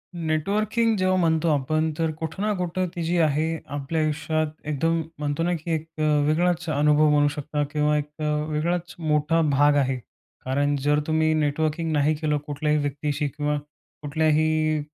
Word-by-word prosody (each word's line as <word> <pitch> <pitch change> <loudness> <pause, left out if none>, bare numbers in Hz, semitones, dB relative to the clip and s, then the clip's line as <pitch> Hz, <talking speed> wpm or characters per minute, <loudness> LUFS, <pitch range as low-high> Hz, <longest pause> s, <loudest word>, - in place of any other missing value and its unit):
Networking 205 +8 0
जेव्हा 185 0 +2
म्हणतो 165 -1 +2
आपण, 155 +3 0
तर 160 -1 0
कुठं 160 +5 -4
ना 210 0 +1
कुठं 180 +1 -1
ती 170 - -3
जी 170 +2 0
आहे 155 +1 +1 0.2
आपल्या 145 +3 -2
आयुष्यात 155 +1 0 0.2
एकदम 165 +3 0 0.2
म्हणतो 145 +2 -1
ना, 175 +1 +1
की 165 +1 -5
एक 160 0 -2
अ, - - +1 0.2
वेगळाच 175 +2 +1
अनुभव 150 +1 +3
बनू 145 0 +4
शकता 145 +1 -3
किंवा 150 0 +2
एक 150 0 -3 0.4
वेगळाच 170 +3 -2
मोठा 155 0 +1
भाग 145 +1 +4
आहे. 135 -2 +1 0.5
कारण 145 +2 +1
जर 145 +1 +3
तुम्ही 160 0 +2
नेटवर्किंग 155 +2 0
नाही 150 +1 +2
केलं 150 -1 0
कुठल्याही 150 +1 0
व्यक्तीशी 145 +1 -2
किंवा 150 +1 -2 0.4
कुठल्याही, 155 +1 +1
155 Hz, 155 wpm, -24 LUFS, 150-165 Hz, 0.5 s, बनू